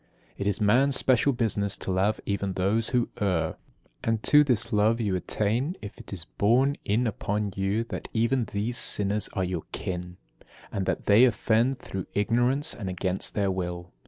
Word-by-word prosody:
22. - - -9
It 100 - 0
is 100 +1 0
man's 125 +6 +3
special 130 +2 +3
business 105 -5 0
to - - -4
love 95 +4 +1
even 100 -1 -2
those 100 +5 +1
who 125 -2 +1
err; 95 -5 0 0.5
and 115 -1 0
to 150 0 +6
this 120 -4 0
love 110 +3 +3
you 105 -5 0
attain, 115 - -1
if 105 - -9
it - - -12
is 90 -4 -4
borne 130 +7 +3
in 110 +5 +1
upon 105 -1 -2
you 100 +3 0
that 115 - -6
even 115 +2 +1
these 105 +4 -2
sinners 105 +1 0
are 95 - -1
your 90 -3 -3
kin, 90 -1 -5 0.5
and 95 -1 -3
that - - -1
they 105 +4 +6
offend 120 +2 +2
through 95 -7 -6
ignorance 120 +8 +2
and 100 -5 -5
against 95 +1 -2
their 100 -2 +1
will. 90 -1 -4
105 Hz, 180 wpm, -27 LUFS, 95-120 Hz, 0.5 s, to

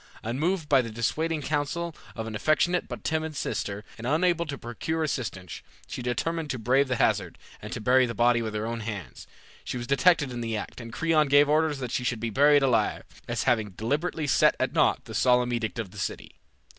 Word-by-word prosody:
Unmoved 155 - -1
by 135 -2 +5
the 115 - -6
dissuading 150 +8 -1
counsel 150 +3 -2 0.2
of 110 - -4
an 110 - -6
affectionate 155 +10 +1
but - - -7
timid 160 -1 -2
sister, 105 -5 -3
and 115 - -4
unable 170 +3 +2
to 140 -2 -4
procure 160 +8 -3
assistance, 100 - -4 0.2
she - - -6
determined 155 +6 -2
to 130 - -2
brave 130 +5 +2
the 130 - 0
hazard, - - +1 0.2
and 105 - -8
to - - -4
bury 125 +3 +4
the 115 - -5
body 120 +1 +3
with 110 -1 -4
her 105 +1 -2
own 115 0 -3
hands. 100 - -7 0.4
She - - -4
was 120 - -4
detected 140 +2 +3
in 120 -1 -5
the 115 -1 -2
act, 105 - -7
and 115 0 -9
Creon 155 +2 +2
gave 145 +1 +5
orders 155 0 +2
that 125 -3 -5
she 125 - -1
should 120 -2 -1
be 115 0 -3
buried 145 +4 +5
alive, 130 -3 +1 0.2
as 120 -1 -1
having 110 -5 +1
deliberately 150 +7 -1
set 145 - +4
at - - 0
naught - - +2
the - - -9
solemn 125 -1 +3
edict 115 -1 -2
of 110 -6 -4
the 105 - -10
city. 85 - -4
125 Hz, 210 wpm, -27 LUFS, 115-155 Hz, 0.4 s, by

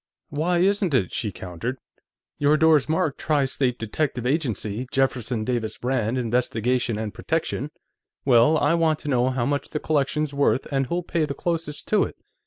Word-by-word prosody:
"Why 165 +5 0
isn't 190 -3 +2
it?" 95 -8 +1
she 105 - -2
countered. 95 +9 -5 0.6
"Your 145 +1 +4
door's 155 -2 +4
marked 160 -3 0
Tri 150 -3 +2
State 130 -2 0
Detective 125 +2 -2
Agency, 125 - -1
Jefferson 125 -4 0
Davis 115 -2 -2
Rand, 125 -2 0
Investigation 120 -1 0
and 110 -2 -4
Protection. - - -2 0.6
Well, 125 +4 +5
I 150 +1 +2
want 165 -2 +2
to 150 - -5
know 125 -1 +2
how 130 -2 -1
much 145 +2 -1
the 150 - -3
collection's 150 0 0
worth, 140 -1 +2
and 135 -2 +1
who'll 175 +5 -1
pay 165 -2 0
the 140 -2 -5
closest 165 -3 -3
to 215 - +4
it. - - -8
135 Hz, 170 wpm, -24 LUFS, 120-155 Hz, 0.6 s, Well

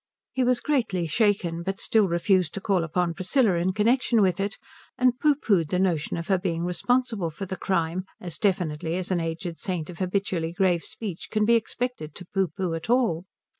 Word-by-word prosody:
He 260 - 0
was 250 0 +2
greatly 230 - 0
shaken, 175 -2 +1
but 195 +3 -3
still 220 -3 +3
refused 175 -1 +1
to - - -2
call 190 -3 +1
upon 170 +1 0
Priscilla 190 - +2
in 175 +2 +1
connection 230 +4 +2
with 185 -2 +1
it, 200 +1 -2 0.4
and 250 -1 +2
pooh 300 -1 +4
poohed 195 - +1
the 180 - 0
notion 175 -5 0
of 165 - -5
her 190 -2 +2
being 170 -3 -2
responsible 220 +1 0
for 160 +5 -6
the 190 - -4
crime 180 -1 -1
as 170 -4 -5
definitely 170 -5 0
as 185 +1 -2
an 180 - +2
aged 165 +1 -4
saint 180 -4 -3
of 170 - -12
habitually 185 -3 -1
grave 180 -3 +2
speech 200 -7 -6
can 215 -1 +1
be 235 - +4
expected 230 - -2
to 180 - -8
pooh 190 +2 0
pooh 175 +2 -3
at 165 +5 -5
all. 230 -9 +2
185 Hz, 200 wpm, -26 LUFS, 170-210 Hz, 0.4 s, pooh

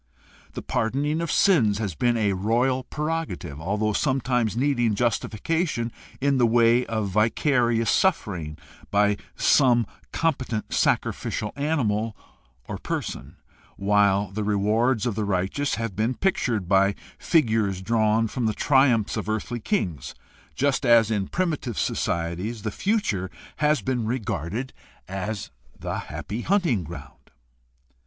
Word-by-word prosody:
The - - -6
pardon 125 +3 -1
ing 155 +2 0
of 170 - -2
sins 120 - +4
has 105 -5 -2
been 120 +9 +1
a 105 -3 +1
royal 120 +7 +1
prerogative, 150 - -4
although 105 +5 0
sometimes 125 -4 0
needing 120 -5 +1
justification 120 - -1 0.3
in 140 -1 +2
the 120 - +5
way 120 +1 +4
of 110 -3 -2
vicarious 115 +2 +2
suffering 90 - 0 0.3
by 105 0 +2 0.2
some 120 -4 +4 0.3
competent 130 -9 -1
sacrificial 105 - 0
animal 115 -8 -1 0.5
or - - -5
person, - - -5 0.4
while 100 -1 +2
the 105 +2 -3
rewards 105 +3 +1
of 120 - 0
the 105 +1 -2
righteous 100 +8 -1
have 115 -4 -4
been 110 +5 0
pictured 120 - 0
by 100 +1 +3 0.2
figures 110 - +2
drawn 110 +1 +2
from 115 +2 -2
the 110 - -1
triumphs 130 -6 +3
of - - -3
earthly 110 +3 -2
kings, 90 - -2 0.4
just 140 0 +1
as 115 -3 +5
in 100 -3 0
primitive 155 - -2
societies 90 +7 -2
the 110 - -2
future 190 - -1 0.3
has 150 0 +2
been 125 -4 -1
regarded 110 - -3 0.3
as 95 +2 -4 0.3
the - - -4
''happy 110 +4 -5
hunting 170 - +1
ground." 80 -3 -11
115 Hz, 130 wpm, -25 LUFS, 100-130 Hz, 0.5 s, the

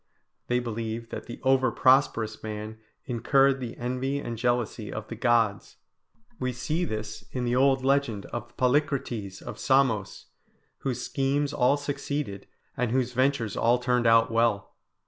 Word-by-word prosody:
They 125 - +2
believed 115 -1 -4
that - - -6
the 120 - -8
over 130 -1 +3
prosperous 120 -5 +3
man 110 0 -6 0.3
incurred 135 +3 +3
the 120 -3 -6
envy 130 +3 -2
and 120 -4 -4
jealousy 120 -2 -1
of 110 -1 -6
the 115 - -5
gods. 115 -3 +1 0.6
We 130 -1 -1
see 155 +8 -1
this 110 -3 -5
in 125 -1 -2
the 120 +1 +1
old 135 0 +3
legend 135 -7 +1
of 120 - -6
Polycrates 125 -7 0
of 105 - -8
Samos, 130 -7 +1 0.5
whose 125 -2 -3
schemes 140 +1 0
all 125 +4 +3
succeeded, 145 -6 -4 0.3
and 125 -1 0
whose 125 0 0
ventures 130 -3 +1
all 120 +2 +3
turned 125 -1 +1
out 115 +1 +5
well. 115 -3 +1
125 Hz, 145 wpm, -27 LUFS, 115-135 Hz, 0.6 s, out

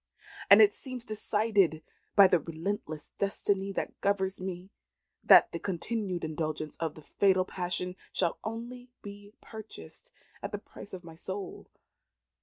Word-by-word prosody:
"And - - +10
it 410 -1 +5
seems 255 - -7
decided 210 -6 +1 0.3
by 200 - +9
the 180 -2 +4
relentless 160 -1 -5
destiny 200 0 0
that - - -4
governs 190 -1 0
me, 185 +1 -6 0.5
that - - +8
the - - -4
continued 190 -1 -3
indulgence 155 -1 -3
of 160 -2 -3
the 155 - -12
fatal 185 +1 +2
passion 180 0 -3 0.2
shall 175 -3 0
only 240 +3 -6
be 205 +1 -10
purchased 215 - -10 0.3
at - - -5
the - - -2
price 200 - -12
of 185 -1 -7
my 165 -1 -11
soul. 190 +4 -6
190 Hz, 140 wpm, -30 LUFS, 170-210 Hz, 0.5 s, And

